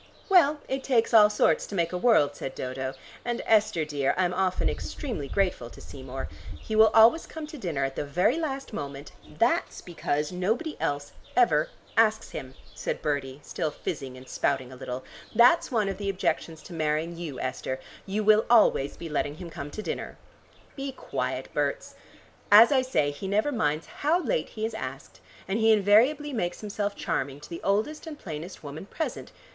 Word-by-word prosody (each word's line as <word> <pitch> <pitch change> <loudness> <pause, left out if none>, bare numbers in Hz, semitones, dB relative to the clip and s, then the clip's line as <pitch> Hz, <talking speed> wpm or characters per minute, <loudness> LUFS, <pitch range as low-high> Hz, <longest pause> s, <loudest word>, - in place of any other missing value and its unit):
"Well, 310 -6 +5
it 265 0 -2
takes 235 -3 +2
all 210 -2 +8
sorts 165 -6 +2
to 205 - -6
make 170 -1 0
a - - 0
world," 165 -11 +4
said 135 - -6
Dodo, 130 +1 -4 0.3
"and, 240 0 -2
Esther 210 -7 +3
dear, 145 -2 0
I'm 180 -1 +2
often 185 0 0
extremely 230 - -4
grateful 180 -8 0
to - - -13
Seymour. 130 - -7 0.3
He 220 - -4
will 220 0 +7
always 230 +9 +6
come 320 -1 -7
to 310 +1 -10
dinner 160 - -2
at 135 - -4
the - - -2
very 180 - +1
last 275 -6 -4
moment 140 -4 -6
" - - -18
"That's 235 - +1
because 150 -3 -2
nobody 220 - -1
else 145 0 -2 0.2
ever 160 -11 +4 0.3
asks 220 -1 +3
him," 130 -2 -7 0.2
said - - -4
Bertie, 140 -2 -2
still 155 - -2
fizzing 135 -3 -5
and 130 0 -13
spouting 130 -2 -1
a - - -9
little. 130 0 -6 0.3
"That's 250 +8 +5
one 220 -5 +1
of 195 0 -3
the 200 -1 -2
objections 165 -4 -2
to 180 - -10
marrying 160 +1 -1
you, 165 -6 -6
Esther, 130 0 -3 0.3
you 205 +2 -1
will 215 +1 +5
always 210 - +4
be 170 - -6
letting 145 -1 -1
him 170 0 -9
come 145 -3 -6
to 215 +8 -6
dinner." - - -5 0.6
"Be 275 -1 -4
quiet, 265 - -3
Berts. - - -1 0.6
As 220 +5 +9
I 265 -2 +4
say, 255 - +1
he 145 +7 -6
never 210 +9 +1
minds 160 - 0 0.2
how 315 +5 +3
late 235 - -1
he 220 0 -4
is 225 - -3
asked, 135 -7 -7 0.3
and 195 +3 0
he 225 0 +5
invariably 225 +9 +4
makes 175 -7 -2
himself 205 -1 -3
charming 135 +1 -2
to 150 - -11
the 170 - -6
oldest 220 +12 0
and 305 -2 -7
plainest 165 - -7
woman 150 +6 -8
present. 320 - -4
185 Hz, 185 wpm, -27 LUFS, 145-225 Hz, 0.6 s, As